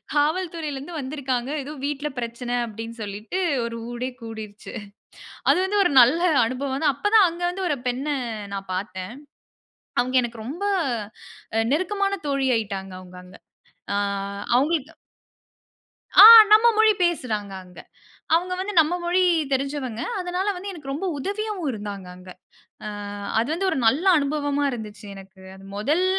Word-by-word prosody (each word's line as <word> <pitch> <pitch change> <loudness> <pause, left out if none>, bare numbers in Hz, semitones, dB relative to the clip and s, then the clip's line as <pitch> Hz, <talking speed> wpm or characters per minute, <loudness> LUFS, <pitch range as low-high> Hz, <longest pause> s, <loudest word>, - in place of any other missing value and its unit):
காவல்துறைலருந்து 310 -1 -1
வந்திருக்காங்க. 260 -2 -3
ஏதோ 285 +3 -8
வீட்ல 295 +1 -3
பிரச்சன 240 +1 -3
அப்பிடின்னு 225 +1 -8
சொல்லிட்டு, 210 - -5 0.3
ஒரு 230 0 -4 0.2
ஊரே 245 +2 -3
கூடிருச்சு. 220 -2 -9 0.8
அது - - +4
வந்து 405 +2 -1
ஒரு 355 - +2
நல்ல 255 +8 +5 0.3
அனுபவம் 265 +3 -3
தான் 290 - +4
அப்ப 285 +9 -1
தான் 410 -4 +7
அங்க 340 +1 -9
வந்து 375 +1 -4
ஒரு 295 - 0
பெண்ண 255 +4 -3 0.5
நான் 195 -1 -6
பார்த்தேன். 185 +1 -5 0.9
அவுங்க 255 +1 -1
எனக்கு 235 -2 -6
ரொம்ப 330 +10 -5 0.9
அ - - +3
நெருக்கமான 395 +5 0
தோழி 275 -1 0
ஆயிட்டாங்க 195 -3 -4
அவுங்க 180 0 -13
அங்க. 180 +1 -14 0.6
ஆ - - 0 0.6
அவுங்களுக்கு 300 +3 +1 1.3
ஆ, - - +12 0.3
நம்ம 440 +2 +7
மொழி 440 0 +6
பேசுறாங்க 220 - -2
அங்க. 180 -1 -17 0.6
அவுங்க 360 +2 +1
வந்து 405 +2 -3
நம்ம 320 +2 +1
மொழி 355 +2 +2 0.3
தெரிஞ்சவங்க. 270 -3 -2 0.2
அதனால 360 +2 -2
வந்து 395 +3 -6
எனக்கு 295 -6 -7
ரொம்ப 320 +8 -3
உதவியாவும் 400 +1 -3
இருந்தாங்க 205 -3 -7
அங்க. 185 0 -13 0.6
ஆ - - -3 0.5
அது 230 - +1
வந்து 365 +4 -1
ஒரு - - -1
நல்ல 275 +10 +3
அனுபவமா 290 -1 0
இருந்துச்சு 215 -4 -8
எனக்கு. 195 0 -14
அது 190 0 -14
மொதல் 300 - +1
270 Hz, 140 wpm, -23 LUFS, 225-340 Hz, 1.3 s, ஆ